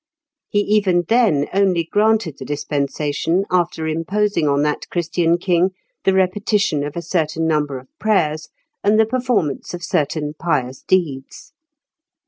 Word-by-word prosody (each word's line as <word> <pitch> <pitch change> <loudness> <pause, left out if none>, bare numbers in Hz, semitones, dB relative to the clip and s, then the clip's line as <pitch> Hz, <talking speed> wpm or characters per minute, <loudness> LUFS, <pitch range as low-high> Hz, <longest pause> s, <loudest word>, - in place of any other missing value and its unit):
He 205 - +2
even 200 -4 +2
then 225 -12 +3
only 190 -3 +2
granted 210 -3 +1
the - - -6
dispensation 145 +5 -1
after 175 -3 0
imposing 165 +2 0
on 140 0 +2
that 150 0 -2
Christian 170 0 +1
king 180 +1 +1 0.3
the 190 - +4
repetition 190 -4 +1
of 145 0 -5
a 170 - -4
certain 165 -2 -1
number 150 -4 0
of 130 +1 -12
prayers 155 -8 0 0.3
and 210 +2 +3
the 220 - +6
performance 220 - -1
of 175 - -9
certain 150 -1 -1
pious 145 -6 -2
deeds. 170 - -2
170 Hz, 135 wpm, -20 LUFS, 150-200 Hz, 0.3 s, the